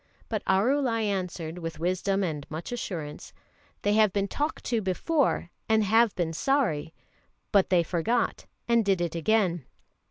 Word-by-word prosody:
But 215 -3 -2
Arulai 230 +4 +2
answered 180 -4 -3
with 165 -2 -5
wisdom 185 +4 0
and 150 -5 -4
much 160 +6 -6
assurance: 165 -11 -5 0.5
"They 205 - +2
have 215 -2 +4
been 200 +1 0
talked 295 +9 -3
to 230 -2 0
before 210 - 0 0.2
and 220 -1 +4
have 225 +2 +3
been 170 -3 -1
sorry, 165 - 0 0.6
but 200 -2 +4
they 180 -2 +4
forgot 185 +9 -1 0.2
and 235 -1 +4
did 195 -3 +2
it 170 -2 -1
again. 175 -2 +1
195 Hz, 150 wpm, -27 LUFS, 170-225 Hz, 0.6 s, have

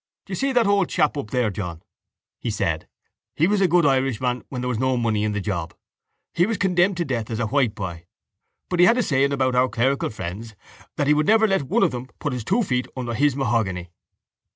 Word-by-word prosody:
—Do - - -13
you - - -1
see 275 0 0
that 245 -3 +3
old 200 -2 +2
chap 150 - +1
up 140 -7 -5
there, 120 -3 0
John? 90 -4 -6 0.6
he 120 - -3
said. 90 -7 -2 0.5
He 160 - +3
was 200 +2 +2
a 190 - +5
good 175 -1 +3
Irishman 130 -2 +1
when 125 -2 -4
there 125 - -2
was 120 -3 -1
no 130 0 +1
money 110 -3 0
in 105 0 0
the 105 - -1
job. 90 -5 -4 0.6
He 175 +3 +2
was 225 -2 -1
condemned 180 0 +2
to 170 - -1
death 120 -6 -3
as 115 -1 -3
a 120 - 0
whiteboy. 105 -9 -1 0.6
But 180 - -2
he 175 - +7
had 235 - +4
a 250 - +2
saying 140 -5 +2
about 130 -2 +1
our 125 +1 +3
clerical 135 +4 0
friends, 105 +2 -7 0.4
that 145 - 0
he 150 - +4
would 150 0 +1
never 220 +1 +5
let 195 -4 +1
one 135 - +1
of - - +3
them 125 +1 -6
put 145 - -3
his 125 -3 -4
two 235 - +1
feet 125 -8 -1
under 120 -2 -3
his 145 +3 +2
mahogany. 110 -9 -1
130 Hz, 230 wpm, -23 LUFS, 110-160 Hz, 0.6 s, he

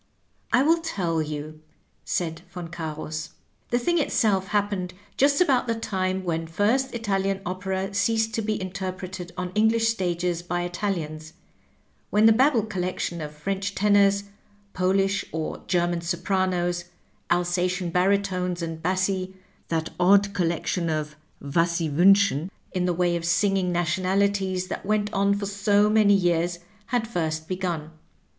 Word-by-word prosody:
" - - -42
I 255 - +5
will 330 +3 +4
tell 175 - -1
you," 155 0 -6 0.4
said 165 -2 -2
Yon 175 -2 -6
Oarus. 155 -2 -5 0.2
" - - -42
The 240 - +2
thing 345 +8 +1
itself 200 -9 +1
happened 200 -3 -1 0.2
just 280 +1 +3
about 270 -9 +3
the 230 - 0
time 190 -4 -2
when 165 -2 -2
first 230 +10 +1
Italian 195 -3 0
opera 190 +2 -3
ceased 225 +2 +1
to 225 - 0
be 215 0 -1
interpreted 185 -1 -5
on 180 0 -3
English 225 +1 +3
stages 175 -4 -1
by 175 0 -2
Italians, 165 -4 -3 0.8
when 210 +1 +4
the 225 - +8
Babel 255 -1 +3
collection 185 -4 -3
of 150 -1 -5
French 195 +6 -3
tenors, 200 -1 +4 0.5
Polish 195 +2 +1
or 160 -1 -4
German 175 -1 +1
sopranos, 175 0 0 0.4
Alsatian 175 0 0
baritones 180 -1 +1
and 165 -1 -5
bassi, 185 +1 -1 0.3
that 165 -1 -2
odd 200 +2 +5
collection 170 -1 -1
of 155 -1 -2 0.2
Was 165 +5 +1
Sie 170 -1 0
toimsohen 185 0 +4 0.2
in 180 -1 -1
the 180 - +1
way 175 0 +1
of 170 - -3
singing 190 +1 +2
nationalities 185 +2 0
that - - -5
went 210 +1 0
on 200 0 +2
for 200 0 -3
so 205 +1 +2
many 210 -2 +5
years 175 -2 +1 0.3
had 235 -1 0
first 160 -6 -2
begun. 175 -4 -3
185 Hz, 145 wpm, -25 LUFS, 175-200 Hz, 0.8 s, the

